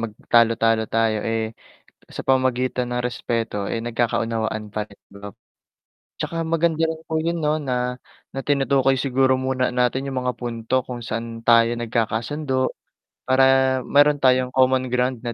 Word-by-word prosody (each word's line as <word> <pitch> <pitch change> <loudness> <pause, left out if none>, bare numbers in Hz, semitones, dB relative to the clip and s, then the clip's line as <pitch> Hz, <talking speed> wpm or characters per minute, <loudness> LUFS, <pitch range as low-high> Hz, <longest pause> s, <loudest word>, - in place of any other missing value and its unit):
mag 115 -2 -4 0.2
talo-talo 115 -1 +4
tayo, 115 -1 +2
eh, 115 0 0 0.7
sa - - -5
pamamagitan 130 -1 +1
ng 125 - -1
respeto, 115 -4 -3
eh, 115 - -1
nagkakaunawaan 115 -2 -1
pa 110 - -1
rin, 100 - -19
'di 100 - -13
ba 100 - -5
po? - - -55 0.8
'Tsaka - - -4 0.2
maganda 165 -1 +2
rin 160 0 -4
po - - -4
'yun 165 +2 -1
'no 150 0 +1
na, 125 -1 -1 0.4
na 135 - -4
tinutukoy 135 -1 +2
siguro 130 0 +2
muna 130 -1 -1
natin 125 +2 0
yung 135 -2 -2
mga 125 0 -1
punto 115 -1 -5
kung 125 -1 -6
saan 115 0 -5
tayo 115 0 +4
nagkakasundo, 120 +5 -2 0.7
para 130 +1 +3 0.4
mayro'n 145 +3 +3
tayong 130 -1 +3
common 130 0 +3
ground 125 0 0
na 120 - -2
125 Hz, 155 wpm, -22 LUFS, 115-135 Hz, 0.8 s, talo-talo